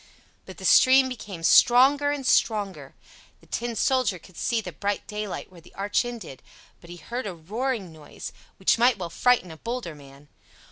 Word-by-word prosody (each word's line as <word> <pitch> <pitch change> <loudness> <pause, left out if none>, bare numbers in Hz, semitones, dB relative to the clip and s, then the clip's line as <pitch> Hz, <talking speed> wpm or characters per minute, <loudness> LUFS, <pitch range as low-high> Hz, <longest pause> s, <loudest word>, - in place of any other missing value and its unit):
But - - -11
the - - -8
stream 260 0 +6
became 205 -8 -8
stronger 270 +9 +5
and 290 -2 -3
stronger. 195 - 0 0.4
The - - -22
Tin 235 0 -4
Soldier 255 -4 +1
could 180 +1 -18
see 235 +6 -1
the 220 - -6
bright 205 0 -3
daylight 210 -3 -6
where 175 -2 -15
the - - -20
arch 200 +4 0
ended; 220 - -8 0.4
but 170 - -16
he 175 - -9
heard 235 +8 -5
a 185 - -6
roaring 210 +2 -4
noise, 155 -2 -10 0.2
which 190 +4 +2
might 245 -1 +4
well 175 -3 -6
frighten 245 -8 +2
a 160 - -11
bolder 235 -4 -5
man. 140 0 -16
210 Hz, 180 wpm, -25 LUFS, 170-245 Hz, 0.4 s, stream